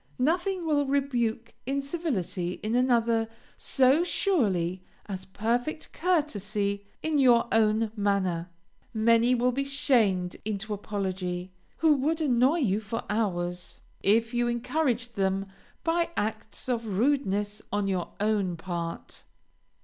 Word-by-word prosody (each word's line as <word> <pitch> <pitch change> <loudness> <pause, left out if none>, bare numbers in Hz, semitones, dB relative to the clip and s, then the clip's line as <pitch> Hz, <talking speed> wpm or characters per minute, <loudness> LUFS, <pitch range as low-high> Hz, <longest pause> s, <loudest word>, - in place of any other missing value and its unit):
Nothing 350 +6 0
will 290 -3 +2
rebuke 240 -5 0
incivility 270 - -2
in 215 +2 -1
another 235 -2 +2 0.3
so 270 +5 +3
surely 190 - 0 0.2
as 190 -2 -6
perfect 240 - -2
courtesy 210 - 0 0.2
in 310 -2 +1
your 245 -3 +5
own 220 0 +3
manner. 190 -4 0 0.5
Many 230 +2 +4
will 250 +1 +2
be 275 +3 -1
shamed 230 -10 +1
into 210 0 -3
apology, 190 -3 -3 0.3
who 320 -2 +5
would 310 +5 0
annoy 270 +1 +3
you 205 -5 +2
for 220 +1 -4
hours, 180 -5 -2 0.2
if 225 +3 +3
you 240 0 +1
encouraged 245 -1 -1
them 195 0 +1 0.4
by 335 +1 +1
acts 220 +1 -3
of 230 -6 -1
rudeness 210 -5 +1
on 205 -1 0
your 185 -3 -2
own 200 -4 +1
part. 170 -1 -5
225 Hz, 120 wpm, -28 LUFS, 195-270 Hz, 0.5 s, your